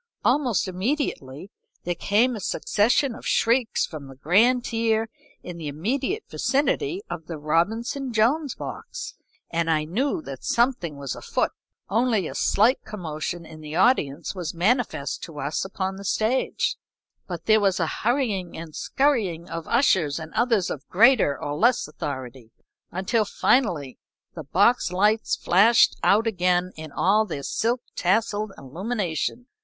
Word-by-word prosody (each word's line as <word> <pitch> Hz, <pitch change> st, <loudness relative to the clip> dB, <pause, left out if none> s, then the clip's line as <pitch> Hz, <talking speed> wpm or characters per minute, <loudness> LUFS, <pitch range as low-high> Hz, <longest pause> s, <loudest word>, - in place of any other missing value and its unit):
Almost 245 Hz, -, +2 dB
immediately 185 Hz, -, -3 dB, 0.3 s
there 175 Hz, -, -1 dB
came 220 Hz, +8 st, +2 dB
a -, -, -5 dB
succession 235 Hz, +7 st, +1 dB
of -, -, -11 dB
shrieks 235 Hz, 0 st, +2 dB
from 150 Hz, -4 st, -9 dB
the 135 Hz, -, -12 dB
grand 225 Hz, -, +3 dB
tier 225 Hz, -1 st, 0 dB, 0.3 s
in 180 Hz, -1 st, -7 dB
the 160 Hz, -3 st, -6 dB
immediate 255 Hz, -, -2 dB
vicinity 360 Hz, +8 st, 0 dB
of 160 Hz, -2 st, -7 dB
the 165 Hz, -, -5 dB
Robinson 220 Hz, -, -1 dB
Jones 255 Hz, +7 st, +1 dB
box, -, -, -7 dB, 0.4 s
and 165 Hz, 0 st, 0 dB
I 155 Hz, -1 st, +2 dB
knew 240 Hz, -, -1 dB
that 135 Hz, -1 st, -8 dB
something 235 Hz, -, 0 dB
was 140 Hz, -3 st, -4 dB
afoot. -, -, -1 dB, 0.4 s
Only 220 Hz, -3 st, +1 dB
a -, -, -6 dB
slight 230 Hz, +6 st, +2 dB
commotion 170 Hz, -3 st, -5 dB
in 160 Hz, -1 st, -12 dB
the 155 Hz, 0 st, -7 dB
audience 170 Hz, -, +2 dB
was 175 Hz, -3 st, -5 dB
manifest 190 Hz, -, 0 dB
to 160 Hz, -4 st, -10 dB
us 145 Hz, +3 st, -2 dB
upon 190 Hz, 0 st, -3 dB
the 200 Hz, -, -9 dB
stage, 220 Hz, +6 st, 0 dB, 0.5 s
but -, -, -6 dB
there 220 Hz, 0 st, +5 dB
was 195 Hz, -2 st, +2 dB
a 165 Hz, -, +2 dB, 0.2 s
hurrying 220 Hz, -7 st, 0 dB
and 160 Hz, -2 st, -8 dB
scurrying 215 Hz, -, 0 dB
of 165 Hz, -1 st, -5 dB
ushers 185 Hz, -, +2 dB
and 160 Hz, -1 st, -8 dB
others 225 Hz, -4 st, +1 dB
of -, -, -7 dB
greater 215 Hz, -, +4 dB
or 145 Hz, -, -3 dB
less 235 Hz, +11 st, +2 dB
authority, 130 Hz, -6 st, -7 dB, 0.4 s
until 195 Hz, +5 st, +1 dB
finally 180 Hz, -, +1 dB, 0.3 s
the 160 Hz, -4 st, -8 dB
box 200 Hz, -, +3 dB
lights 210 Hz, +4 st, +2 dB
flashed 210 Hz, +6 st, +4 dB
out 215 Hz, +3 st, +4 dB
again 180 Hz, -3 st, +1 dB
in 155 Hz, -1 st, -9 dB
all 205 Hz, +8 st, +3 dB
their 145 Hz, -10 st, -5 dB
silk 235 Hz, -, 0 dB
tasselled 210 Hz, +2 st, 0 dB
illumination. 185 Hz, -, -3 dB
195 Hz, 145 wpm, -24 LUFS, 160-235 Hz, 0.5 s, there